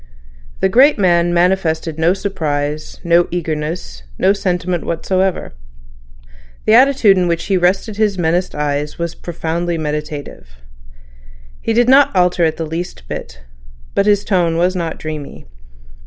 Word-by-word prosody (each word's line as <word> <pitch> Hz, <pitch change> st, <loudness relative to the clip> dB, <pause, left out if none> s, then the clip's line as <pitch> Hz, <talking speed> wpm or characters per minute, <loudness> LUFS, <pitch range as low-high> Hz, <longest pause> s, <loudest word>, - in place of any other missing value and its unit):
The -, -, +4 dB
great 260 Hz, +9 st, +5 dB
man 175 Hz, -3 st, +2 dB
manifested 170 Hz, -3 st, 0 dB
no 170 Hz, +3 st, +3 dB
surprise, 155 Hz, -6 st, -3 dB
no 170 Hz, 0 st, +3 dB
eagerness, 155 Hz, -, -4 dB, 0.2 s
no 195 Hz, -, +3 dB
sentiment 180 Hz, -3 st, -2 dB
whatever. 185 Hz, -, -1 dB, 1.1 s
The 215 Hz, -, +4 dB
attitude 245 Hz, -6 st, +5 dB
in 180 Hz, -, +1 dB
which 170 Hz, -1 st, -1 dB
he 195 Hz, -, 0 dB
rested 190 Hz, +4 st, 0 dB
his 210 Hz, -3 st, +1 dB
menaced 175 Hz, +1 st, 0 dB
eyes 150 Hz, 0 st, -2 dB
was 170 Hz, -1 st, -3 dB
profoundly 170 Hz, 0 st, -3 dB
meditative. 150 Hz, -, -5 dB, 1.1 s
He 225 Hz, -, -1 dB
did 240 Hz, +1 st, +3 dB
not 270 Hz, -3 st, +5 dB
alter 180 Hz, -1 st, +2 dB
it 160 Hz, -1 st, +1 dB
the 165 Hz, -, -3 dB
least 160 Hz, -, -6 dB
bit. -, -, -7 dB, 0.5 s
But 200 Hz, -, +1 dB
his 205 Hz, -1 st, +3 dB
tone 175 Hz, -5 st, +1 dB
was 180 Hz, +2 st, +1 dB
not 170 Hz, -3 st, -3 dB
dreamy. 155 Hz, -2 st, -7 dB
175 Hz, 140 wpm, -17 LUFS, 160-190 Hz, 1.1 s, great